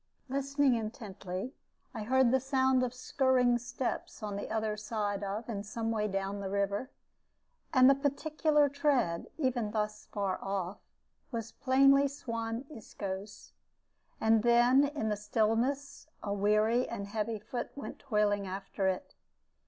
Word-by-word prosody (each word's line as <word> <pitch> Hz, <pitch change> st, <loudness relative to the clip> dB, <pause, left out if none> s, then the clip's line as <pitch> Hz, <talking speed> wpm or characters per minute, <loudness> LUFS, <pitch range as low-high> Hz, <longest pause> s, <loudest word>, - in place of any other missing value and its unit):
Listening 275 Hz, 0 st, +2 dB
intently, 215 Hz, -1 st, -4 dB, 0.4 s
I 225 Hz, -, -5 dB
heard 255 Hz, +2 st, +3 dB
the 265 Hz, -, +4 dB
sound 265 Hz, 0 st, +2 dB
of 250 Hz, -1 st, 0 dB
skirring 250 Hz, -1 st, +2 dB
steps 245 Hz, -1 st, -4 dB
on 205 Hz, -1 st, -3 dB
the 200 Hz, -, -5 dB
other 220 Hz, -1 st, -1 dB
side 210 Hz, -2 st, -2 dB
of 205 Hz, +3 st, -3 dB
and 205 Hz, -4 st, -3 dB
some 225 Hz, +2 st, -3 dB
way 210 Hz, -2 st, 0 dB
down 195 Hz, 0 st, -2 dB
the 195 Hz, -1 st, -4 dB
river; 200 Hz, +4 st, -1 dB, 0.8 s
and 255 Hz, -4 st, +7 dB
the 275 Hz, -, +8 dB
peculiar 295 Hz, +2 st, +2 dB
tread, 270 Hz, -, +1 dB
even 250 Hz, -7 st, 0 dB
thus 210 Hz, 0 st, -3 dB
far 200 Hz, -2 st, -2 dB
off, 195 Hz, -1 st, -3 dB, 0.5 s
was 230 Hz, -2 st, -4 dB
plainly 275 Hz, +1 st, +4 dB
Suan 230 Hz, -2 st, -4 dB
Isco's. 205 Hz, -6 st, -7 dB, 0.7 s
And 220 Hz, 0 st, +4 dB
then 240 Hz, +4 st, +5 dB
in 285 Hz, -6 st, -2 dB
the 210 Hz, -, +1 dB
stillness 225 Hz, +8 st, 0 dB, 0.2 s
a 200 Hz, -, -1 dB
weary 215 Hz, +4 st, +2 dB
and 200 Hz, -, -4 dB
heavy 215 Hz, +2 st, -2 dB
foot 240 Hz, +4 st, -5 dB
went 280 Hz, -, -7 dB
toiling 210 Hz, -5 st, +1 dB
after 195 Hz, +1 st, -3 dB
it. 185 Hz, -1 st, -2 dB
225 Hz, 140 wpm, -31 LUFS, 205-260 Hz, 0.8 s, the